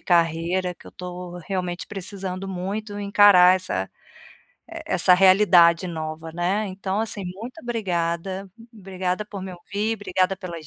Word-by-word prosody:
carreira 175 +1 +1
que - - -18
eu - - -12
tô 180 0 -8
realmente 180 -2 -3
precisando 195 -1 -6
muito 205 +3 -4
encarar 200 -3 +6
essa 95 - -3 0.8
e - - -7
essa 180 - +4
realidade 185 -2 +5
nova, 160 -1 -6
né. 180 +5 0
Então, 190 +2 -3
assim, 220 -2 -2
muito 225 - -8
obrigada, 190 -4 -2 0.2
obrigada 190 -1 -3
por 200 -2 -8
me 190 - -6
ouvir, 200 +5 -3
obrigada 190 -2 0
pelas 170 -4 -8
185 Hz, 135 wpm, -23 LUFS, 175-200 Hz, 0.8 s, encarar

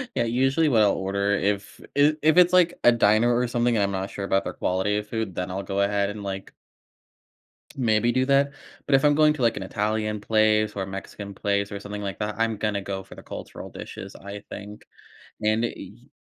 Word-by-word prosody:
Yeah, - - +2
usually, 135 +7 +2
what 115 -5 +4
I'll 100 - +4
order 100 +1 -1
if 100 0 -1
it 150 +2 +4
if 155 +3 +4
it's, 180 0 +6
like, 175 -1 +4
a 120 - +9
diner 115 +2 +4
or 125 +1 +2
something, 120 0 +1
and 105 - +2
I'm 100 - 0
not 95 0 -3
sure 100 - -6
about 95 0 +1
their - - -4
quality 95 +3 0
of 105 0 -4
food, 110 -5 -3
then 90 0 -3
I'll 95 +1 -3
go 100 0 -1
ahead 100 0 +1
and, 105 0 -7
like 95 -1 -6 1.2
maybe 115 -1 +2
do 130 0 +2
that. 140 +1 +3 0.3
But 140 - +2
if 135 - +4
I'm 145 0 +5
going 155 0 +5
to, 135 - -4
like, 115 -1 +2
an - - -4
Italian 105 +1 -2
place, 110 0 +2
or 100 - -1
a - - -9
Mexican 100 +1 -7
place, 100 +1 -1
or 100 - -5
something 105 0 -6
like 100 -3 -4
that, 105 0 -2
I'm 115 -1 +1
gonna 105 -2 -1
go 95 -1 -4
for - - -14
the - - -11
cultural - - -8
dishes, 95 0 -9
I 100 +1 -9
think, 105 +1 -9 0.6
and 110 +2 +2
i 120 - -1
y - - -12
105 Hz, 225 wpm, -25 LUFS, 100-120 Hz, 1.2 s, a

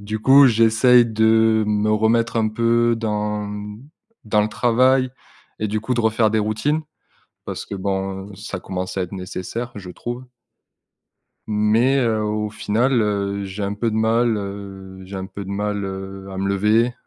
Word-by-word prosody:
du 105 +2 -4
coup, 135 +5 +7
j'essaye 115 +1 +5
de 110 0 +3
me 105 0 +1
remettre 115 +2 +2
un 110 -1 +2
peu 115 +1 +2
dans 105 -2 -2 0.8
dans 105 -1 +2
le 105 - -1
travail 130 +3 +2 0.5
et 110 - -1
du 105 +1 -1
coup, 125 +3 -2
de 120 - 0
refaire 110 -1 +2
des 110 - +1
routines 110 +9 0 0.6
parce - - -5
que - - -6
bon, 95 0 -3
heu, - - -12
ça 100 -1 -6
commence 95 +1 -5
à - - +1
être 90 - -5
nécessaire, 95 +6 -5
je 95 -3 -8
trouve. 120 +7 -6 1.3
Mais, 110 +5 +3
heu, 115 -3 +1
au 105 0 -2
final, 115 +5 +1
heu, 100 -1 -1
j'ai 95 +2 -6
un 100 0 -1
peu 115 +3 -1
de 110 - -2
mal, 115 +1 +2
heu, 100 -1 -7
j'ai 95 +1 -8
un 95 - -4
peu 100 +1 -8
de - - -6
mal, 105 0 -2
heu, 95 0 -6
à 95 - -7
me 95 +1 -2
lever. 105 +5 +2
105 Hz, 175 wpm, -21 LUFS, 100-115 Hz, 1.3 s, coup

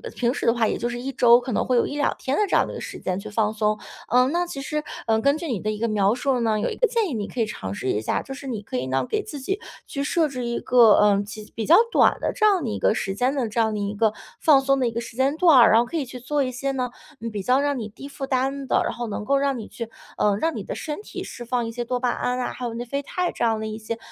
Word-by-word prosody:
平 240 0 +1
时 - - -4
的 230 - +4
话 235 -2 +1
也 - - -1
就 240 - -2
是 240 0 -4
1 270 +2 -4
周 240 -1 +6
可 250 +1 -5
能 210 - 0
会 255 - +2
有 - - +3
1-2 290 0 0
天 265 - -1
的 425 - +3
这 - - +1
样 - - +4
的 - - -7
一 - - -7
个 - - -6
时 - - -7
间 185 0 -2
去 215 +2 -8
放 215 0 0
松。 215 0 0 0.3
呃， 250 +1 +4
那 345 +4 0
其 275 -6 -6
实， 300 +2 -3 0.2
呃， 220 0 +3
根 280 +4 +3
据 335 - -5
你 235 -9 -2
的 215 - -2
一 210 - -5
个 230 - 0
描 205 -1 +2
述 255 +1 0
呢， 220 -2 +1
有 215 - 0
一 - - -4
个 - - +2
建 455 -3 +1
议 - - -4
你 210 -3 -3
可 250 - -7
以 - - +3
尝 95 - -6
试 130 - -5
一 105 - 0
下， 110 - -1
就 270 - -8
是 275 +1 -9
你 225 -5 -3
可 165 - -5
以 130 +1 -2
呢 135 - 0
给 430 -1 0
自 345 -9 -7
己 385 +10 -2 0.3
去 280 - -3
设 315 +2 +2
置 255 -4 -5
一 235 0 -2
个， 235 -4 +6
呃， 205 -1 +4
几 215 +1 -10
比 220 - -2
较 330 - +7 0.2
短 - - +4
的 - - -1
这 430 - +1
样 390 -5 +4
的 240 - -2
一 215 - -3
个 - - +3
时 195 -3 -3
间 250 +5 +1
的 260 -4 0
这 225 - -2
样 220 -1 +1
的 210 - -2
一 205 0 -2
个 215 0 +2 0.3
放 285 -4 +5
松 275 0 +2
的 250 - +2
一 - - -1
个 230 - -3
时 235 - -9
间 270 +3 +2
段 330 -6 +6
儿， 235 - +7
然 225 - +6
后 235 - +2
可 330 - -4
以 285 - -1
去 250 0 -9
做 280 +3 0
一 255 - -2
些 275 +2 -2
呢， 255 -2 -2 0.3
嗯 230 0 -4
比 205 - -1
较 255 +4 +3
让 285 -1 0
你 220 -3 -5
低 270 +6 -10
负 280 -1 -6
担 270 +1 -1
的， - - +3
然 - - -2
后 240 -1 -4
能 210 0 -4
够 275 +5 +3
让 275 -1 0
你 220 - -7
去， 230 -1 -7 0.3
呃， 205 -1 +2
让 325 +7 0
你 - - -4
的 - - -5
身 300 +4 -5
体 - - -7
释 240 - -8
放 240 0 -1
一 - - -4
些 240 +1 -3
多 250 +1 -2
巴 250 - +1
胺 250 0 -1
啊， 250 - -2
还 250 - -6
有 235 - -3
内 240 +1 -4
啡 280 +4 -2
肽 360 +4 -1
这 - - -3
样 225 -1 +2
的 220 - -3
一 215 0 -5
些 225 +1 -5
245 Hz, 350 characters per minute, -24 LUFS, 220-275 Hz, 0.3 s, 较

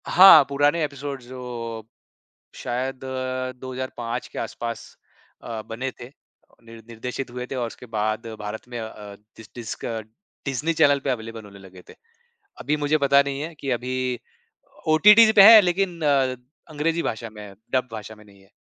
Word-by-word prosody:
हाँ, 180 -5 +9
पुराने 145 +4 +2
एपिसोड्स, 140 -2 -5
जो 120 -3 -7 0.7
शायद 130 +2 -4 0.6
2005 125 -2 -5
के - - -9
आसपास 115 -1 -5 0.6
अ, 115 -2 -5
बने 115 +5 -5
थे, 120 - -7 0.6
निर 115 0 -13
निर्देशित 125 +3 -6
हुए 125 0 -6
थे - - -4
और 125 -2 -2
उसके 120 +2 -11
बाद 110 0 -2
भारत 105 +3 -7
में 120 -1 -6
अ 110 - -5
अ, 105 -2 -11 0.2
डिस 110 -1 -13
डिस्क 120 -3 -7 0.6
डिज़्नी 135 +5 -1
चैनल 145 -3 +4
पे 140 - 0
अवेलेबल 115 -2 -5
होने 100 -1 -13
लगे 95 -2 -14
थे। - - -13 0.7
अभी 150 - 0
मुझे 150 +1 +1
पता 140 -1 +4
नहीं 140 0 -4
है 160 +3 -5
कि 135 - -3
अभी 125 0 -2 0.7
ओटीटी 210 +8 +7
पे 200 - +8
है, 220 +2 +11
लेकिन 180 -2 -1 0.7
अंग्रेज़ी 160 +3 -1
भाषा 115 0 -4
में 105 -1 -10
है, 100 -1 -11 0.2
डब 130 -1 +1
भाषा 110 0 -7
में 105 - -17
नहीं 100 -1 -20
है। 95 - -25
125 Hz, 165 wpm, -23 LUFS, 115-145 Hz, 0.7 s, है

